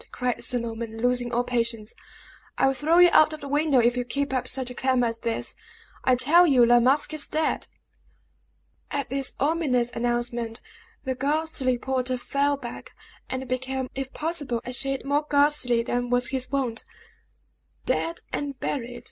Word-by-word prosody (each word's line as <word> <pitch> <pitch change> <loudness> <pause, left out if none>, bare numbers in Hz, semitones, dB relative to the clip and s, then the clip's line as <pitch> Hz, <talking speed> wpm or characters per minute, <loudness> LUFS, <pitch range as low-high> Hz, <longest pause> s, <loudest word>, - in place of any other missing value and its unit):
cried 250 -1 -2
Sir 250 - +2
Norman, 230 -1 -5
losing 245 0 +1
all 240 +1 +1
patience, 230 -3 -2 0.6
"I - - +3
will 270 - +3
throw 310 +5 +2
you 355 0 +7
out 310 0 +6
of 310 - -8
the 285 - -6
window 290 0 +2
if 240 0 +4
you 250 - -1
keep 280 +2 -2
up 255 - -1
such 260 -2 -4
a - - -6
clamor 255 -1 +1
as 230 -1 -2
this. 230 -1 -1 0.5
I 255 - +4
tell 330 +8 +6
you 255 -5 +5
La 240 +1 +6
Masque 275 +5 +2
is 305 -2 +1
dead!" 315 0 -1 1.2
At 280 -2 -3
this 270 0 -2
ominous 275 -5 +1
announcement, 240 -1 -2 0.4
the 260 - -1
ghastly 275 -1 0
porter 255 0 -1
fell 280 +3 0
back, 240 -4 -9 0.3
and 260 0 -4
became, 260 0 -3
if 270 0 -4
possible, 300 -7 -2
a 250 - -5
shade 270 +2 -1
more 290 +2 0
ghastly 285 -5 +2
than 245 +1 -2
was 245 0 +1
his 260 -1 -3
wont. 255 -4 -1 1.0
"Dead 335 +1 -1
and 280 -2 -3
buried!" 245 -3 -3
255 Hz, 170 wpm, -25 LUFS, 245-285 Hz, 1.2 s, you